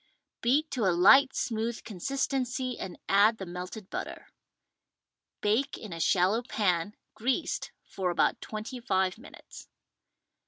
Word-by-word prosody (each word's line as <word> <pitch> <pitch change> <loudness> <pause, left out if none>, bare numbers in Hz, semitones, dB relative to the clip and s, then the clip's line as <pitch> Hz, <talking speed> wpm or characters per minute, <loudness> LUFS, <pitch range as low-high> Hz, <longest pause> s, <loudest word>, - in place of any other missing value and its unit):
Beat 285 +6 +2
to 240 -5 0
a 175 -2 +2
light 265 +9 +7
smooth 230 -1 -2
consistency 255 +4 -2
and 180 -2 -6
add 210 +3 +5
the 190 - -6
melted 180 +3 -7
butter. - - -6 1.1
Bake 230 +7 +1
in 210 -6 -8
a 165 - -6
shallow 185 +7 +3
pan 205 -5 0 0.2
(greased) 260 +8 -1
for 185 -2 -3
about 175 - +1
twenty 215 +4 -6
five 190 -4 0
minutes. 280 - -13
215 Hz, 125 wpm, -29 LUFS, 185-255 Hz, 1.1 s, light